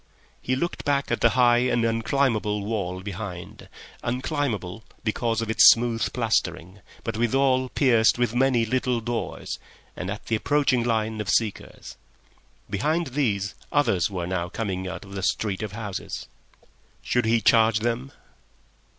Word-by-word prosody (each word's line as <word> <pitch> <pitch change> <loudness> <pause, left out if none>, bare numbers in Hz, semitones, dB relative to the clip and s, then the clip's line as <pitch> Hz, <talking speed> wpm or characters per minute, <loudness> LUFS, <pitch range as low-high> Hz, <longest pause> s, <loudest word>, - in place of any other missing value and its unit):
He 130 - 0
looked 170 +7 -3
back 140 -3 0
at 120 - 0
the 120 - +6
high 120 -1 +5
and 120 -2 +1
unclimbable 115 -3 0
wall 95 -4 -3
behind—unclimbable 110 - -5 0.2
because 115 +1 0
of 115 - -4
its - - +8
smooth 115 -1 +2
plastering, 95 -6 -1 0.2
but 115 -1 -3
withal 130 +2 +2
pierced 120 -6 +3
with 120 -2 0
many 125 -2 +2
little 125 +1 0
doors 120 +1 -4 0.4
and 90 - -5
at 100 +1 -6
the 115 - 0
approaching 140 +1 +2
line 110 -2 -1
of 105 - -5
seekers. 110 -3 -2 0.7
Behind 155 - 0
these 100 -9 0 0.2
others 100 - +2
were 90 -3 -3
now 90 -1 -2
coming 95 -3 -3
out 95 +3 -6
of 100 - -13
the 100 - -4
street 100 +1 -1
of 105 -2 -5
houses. 105 -3 -5 0.8
Should 125 -2 +1
he 115 +1 +3
charge 110 -1 +4
them? 120 +4 -2
115 Hz, 140 wpm, -25 LUFS, 100-125 Hz, 0.8 s, its